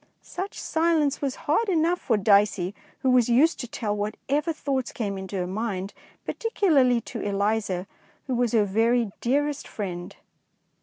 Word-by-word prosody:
Such 380 +3 -6
silence 320 -3 +1
was 275 -2 -1
hard 405 +9 +2
enough 345 0 +2
for 225 - +1
Dicey, 200 -2 +3 0.3
who 260 - +3
was 245 -2 +4
used 280 +8 +4
to 245 - -4
tell 215 -3 -3
what 210 +1 -3
ever 300 +4 +1
thoughts 270 -5 -2
came 205 -4 -3
into 190 +1 -6
her 180 -2 -1
mind, 195 0 -3 0.3
par - - -2
ticularly 285 - +2
to - - -6
Eliza, 200 -2 0 0.4
who 265 - -2
was 245 -1 +1
her 215 -3 +4
very 225 +2 +2
"dearest 290 +3 0
friend." 180 -4 -5
235 Hz, 160 wpm, -25 LUFS, 205-290 Hz, 0.4 s, was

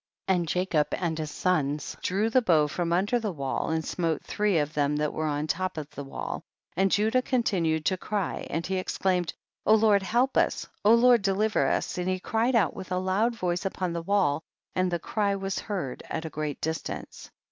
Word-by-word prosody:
32. 190 - +4
And 170 - -2
Jacob 175 -3 +1
and 170 -3 -1
his 155 -1 -3
sons 150 -5 0
drew 205 +5 0
the 255 - +5
bow 160 -9 +4
from 170 +3 -2
under 200 +8 +2
the 215 -3 -2
wall, 140 -5 -2
and 160 0 -1
smote 165 -4 -1
three 210 -4 +1
of 150 0 0
the 150 - 0
men 150 - 0
that 150 0 0
were 155 0 -1
upon 145 0 -1
the 155 - +1
top 185 0 -3
of 155 0 -5
the 145 - -6
wall, 135 - -5 0.3
and 190 +2 +3
Judah 220 +6 +3
continued 175 - 0
to 185 - +2
cry 200 0 -3
and 165 - -2
he 190 0 -1
exclaimed, 185 -2 0 0.4
O 215 - +7
Lord 210 -2 +4
help 240 +7 +1
us, - - +2 0.2
Lord 235 +2 +6
deliver 205 +3 +2
us, - - -1
and 180 +1 -1
he 185 0 0
cried 225 +6 +1
out 210 -7 +3
with 185 - -8
a 180 - +1
loud 195 +6 +1
voice 180 -3 -1
upon 185 -3 -2
the 170 - -2
wall, 175 -5 +2 0.3
and 185 0 +1
the 175 - 0
cry 200 +4 0
was 195 -1 -3
heard 180 - -4
at 160 - -3
a 160 - -5
great 150 -1 -3
distance. 160 +1 -5
185 Hz, 210 wpm, -27 LUFS, 160-205 Hz, 0.4 s, O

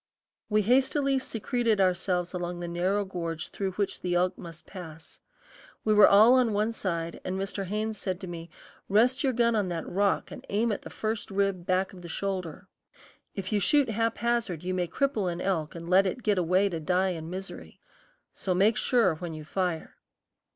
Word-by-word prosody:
We 210 0 +3
hastily 270 +4 +2
secreted 230 -2 -1
ourselves 180 -1 +1
along 175 -1 -4
the 175 - -4
narrow 185 +4 0
gorge 170 -4 -4
through 195 -2 -3
which 200 +1 -2
the 175 -1 -1
elk 180 +1 +2
must 165 -1 -11
pass. 160 -4 -11 0.7
We 215 - +4
were 210 -1 +8
all 215 +5 +7
on 250 -4 +3
one 210 +2 +1
side, 170 -6 -3
and 185 +1 -3
Mr. 195 0 -3
Haynes 215 +2 -3
said 185 -2 -3
to 190 - -6
me, 170 -1 -7 0.4
"Rest 235 +8 +3
your 270 - +3
gun 235 -1 +2
on 205 -3 +1
that 170 -2 -4
rock 200 +1 0
and - - -9
aim 220 +3 +1
at 205 - -3
the - - -9
first 215 -1 -3
rib 195 -3 -1
back 185 +1 +1
of 180 - -11
the 170 - -9
shoulder. 185 -3 -4 0.7
If 195 +1 -4
you 210 - +3
shoot 260 +6 +3
haphazard 230 -5 -1
you 185 +1 -2
may 180 -1 0
cripple 215 -3 0
an 170 - -5
elk 175 -5 -1
and 170 0 -7
let 190 +2 +5
it 230 +6 -4
get 205 -3 +2
away 185 +3 +3
to 170 -3 -3
die 180 +4 +1
in 165 -2 -5
misery. 190 +2 -8 0.5
So 185 -2 -2
make 210 +4 +3
sure 230 -7 +3
when 170 -1 -6
you 155 -1 -8
fire." 180 -1 -3
190 Hz, 195 wpm, -28 LUFS, 175-215 Hz, 0.7 s, were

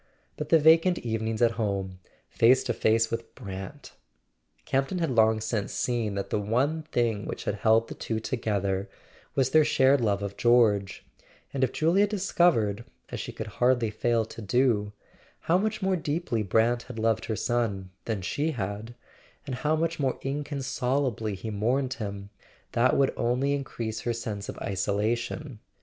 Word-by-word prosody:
But 150 0 -5
the 165 - +7
vacant 165 +3 +5
evenings, 110 0 -1
at 115 - +5
home, 95 -3 -2 0.3
face 125 +3 +4
to - - -1
face 115 +1 +2
with 115 0 -5
Brant! 95 -6 -8 0.7
Campton 135 +7 0
had 165 -5 0
long 110 -2 +4
since 110 -2 -2
seen 115 -5 -1
that 100 - -4
the - - +1
one 130 +10 0
thing 120 -8 -1
which - - -5
had - - -1
held 110 +2 +3
the - - -6
two 110 -1 -3
together 100 -5 -2 0.5
was 130 -1 +2
their 155 +1 +6
shared 135 -1 +4
love 100 -3 +1
of 100 0 -5
George; 110 -5 +3 0.5
and 135 -1 0
if 130 - +2
Julia 180 +6 +3
discovered, 170 - +2 0.3
as - - -4
she - - -5
could - - -6 0.2
hardly 120 -3 +3
fail 115 +1 +1
to 115 - -10
do, 110 -1 +1 0.5
how 175 +3 +2
much 215 0 -2
more 190 0 +2
deeply 155 -7 -1
Brant 115 +4 +2
had 125 - -7
loved 110 -2 +1
her 110 - -2
son 105 -6 -1
than 110 -5 -2
she 150 - -1
had, 105 +1 -5 0.5
and 135 - -5
how 150 +5 0
much 165 +1 -1
more 135 -3 0
inconsolably 135 -5 -1
he 110 +4 -6
mourned 125 +6 0
him, 100 -2 -6 0.4
that 125 +2 +3
would 135 -1 +3
only 125 +4 +1
increase 120 -5 -4
her 120 - -1
sense 105 -3 -5
of - - -6
isolation. 110 +6 -2
115 Hz, 165 wpm, -27 LUFS, 105-135 Hz, 0.7 s, the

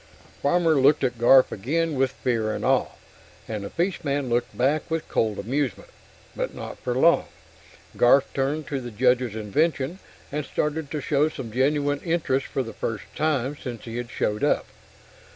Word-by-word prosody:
Farmer 160 -1 +3
looked 145 +2 +4
at 125 -3 -1
Garf 130 +2 +6
again 160 +10 -1
with 135 -1 +1
fear 115 -5 -1
and - - -4
awe, - - +3 0.6
and 105 -2 -4
the 100 - -5
fishman 145 -7 -1
looked 120 +1 -1
back 140 +7 +1
with 165 -1 -2
cold 110 -2 0
amusement. 130 +4 -2 0.4
But - - -3
not - - -7
for 125 -1 -2
long. 165 +6 +4 0.7
Garf 130 +3 +5
turned 145 +3 -1
to 140 -2 -2
the 120 - -6
Judge's 125 0 +1
invention 140 - 0 0.3
and 150 +1 -2
started 150 +1 -2
to 150 -1 -3
show 150 +2 +2
some 125 -7 -7
genuine 145 +3 +1
interest 155 -6 0
for 135 - -2
the 115 - -8
first 105 -6 -4
time 145 -3 0
since 125 -5 -7
he 115 0 -6
had 120 -1 -4
showed 105 -4 -1
up. - - +2
135 Hz, 170 wpm, -25 LUFS, 120-150 Hz, 0.7 s, Garf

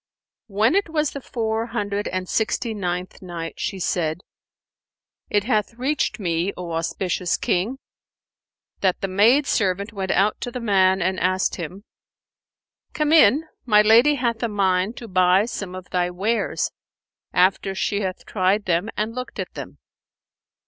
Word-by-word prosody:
When 215 +5 +2
it 395 -2 +1
was 305 -3 0
the 280 - -7
Four 225 -2 -2
Hundred 205 -3 -2
and 185 0 -3
Sixty 225 +3 -1
ninth 180 -3 -4
Night, 170 -3 -6
She 195 - -2
said, 170 -2 -1 1.1
It 205 -1 +2
hath 215 -1 0
reached 260 -1 -1
me, 175 0 -1
O 175 -2 -6
auspicious 175 +2 -1
King, 205 +9 -1 1.0
that 190 -2 +1
the 195 - -1
maid 225 +10 +4
servant 200 -2 0
went 190 -2 -4
out 200 +3 +2
to - - -3
the 250 - -5
man 190 -4 +3
and 185 +1 0
asked 185 +1 +1
him, 180 +3 -7 1.1
"Come 300 -1 0
in; 305 0 +6 0.2
my 210 -2 +6
lady 235 +7 +6
hath 235 -4 -1
a 235 - +1
mind 195 +1 +1
to 235 - -8
buy 185 +1 +4
some 200 -6 -5
of 185 -1 -10
thy 180 -1 +1
wares, 205 +6 -1 0.6
after 190 +1 +2
she 200 +2 -1
hath 185 -1 -4
tried 200 +1 +1
them 175 +4 0
and 215 +2 -1
looked 250 +1 -6
at - - -5
them." - - -8
200 Hz, 155 wpm, -23 LUFS, 185-230 Hz, 1.1 s, in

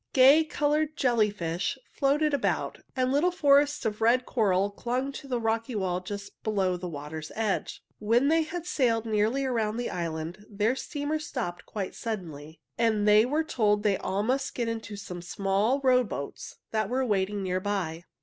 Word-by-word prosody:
Gay 275 +4 +7
colored 305 0 0
jellyfish 210 -6 0 0.2
floated 290 +2 +2
about, 280 - -1 0.2
and 255 -1 +1
little 295 +6 +3
forests 290 -5 +3
of 215 0 -2
red 245 +3 +4
coral 200 -4 +1
clung 250 +6 -2
to 275 +1 -9
the 250 -2 -1
rocky 225 +1 -1
wall 185 -3 0
just 200 +2 -8
below 195 -4 0
the 180 0 -5
water's 155 +1 -7
edge. 215 -3 -2 0.2
When 230 +6 +3
they 325 +2 +4
had 335 +2 -4
sailed 235 -9 +1
nearly 220 +5 +1
around 225 -4 0
the 245 - -2
island, 165 +2 -4
their 215 +4 +1
steamer 295 +2 -3
stopped 250 - -5
quite 200 -3 -4
suddenly, 165 -8 -6 0.2
and 220 -3 +2
they 210 +2 +6
were 300 +4 +1
told 210 -8 +1
they 205 -3 +2
must 245 +8 0
all - - -19
get 240 -2 -1
into 225 -2 -4
some 180 -3 -7
small 195 +8 0
rowboats 250 - 0 0.2
that 215 -2 0
were 260 +2 0
waiting 200 -2 0
near 185 0 0
by. 185 -5 -2
220 Hz, 170 wpm, -28 LUFS, 195-265 Hz, 0.2 s, Gay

